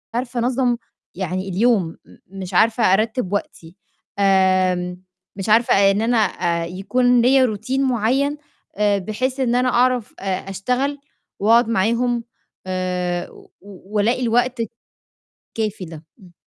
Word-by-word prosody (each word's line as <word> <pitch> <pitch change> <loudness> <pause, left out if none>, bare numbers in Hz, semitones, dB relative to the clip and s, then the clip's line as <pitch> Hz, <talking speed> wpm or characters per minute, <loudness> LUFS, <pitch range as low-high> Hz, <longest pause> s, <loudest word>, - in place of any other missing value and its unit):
عارفة 245 0 -2
أنظَّم 245 0 +1 0.4
يعني 185 +1 -3
اليوم، 200 -1 +2 0.2
م - - -18 0.2
مش 185 0 -7
عارفة 225 +5 +3
أرتِّب 220 -1 0
وقتي، 170 -4 -5 0.4
آمم 185 -2 +2 0.3
مش 195 +2 -4
عارفة 230 +3 +4 0.2
إن 205 +2 0
أنا 235 +1 +1
آآ، 170 -5 0
يكون 245 +7 +1
ليّا 255 -2 +4
routine 250 +6 -3
معيّن، 265 +3 +1 0.4
آآ، 205 -1 +2
بحيث 255 +7 -3
إن 245 -2 +1
أنا 250 +1 +2
أعرف 245 -2 +1
آآ، 195 0 -3
أشتغل 250 +9 -2 0.4
وأقعُد 225 +3 +4
معاهم 235 +3 +1 0.4
آآ، 180 -1 -2
و - - -18
و 200 +1 -13
والاقي 235 +5 +1
الوقت 245 +1 +1
ت 225 - -3 0.9
الكافي 210 -4 -2
ده، 160 -1 -11 0.2
إمم. 180 -2 -17
220 Hz, 135 wpm, -20 LUFS, 185-245 Hz, 0.9 s, عارفة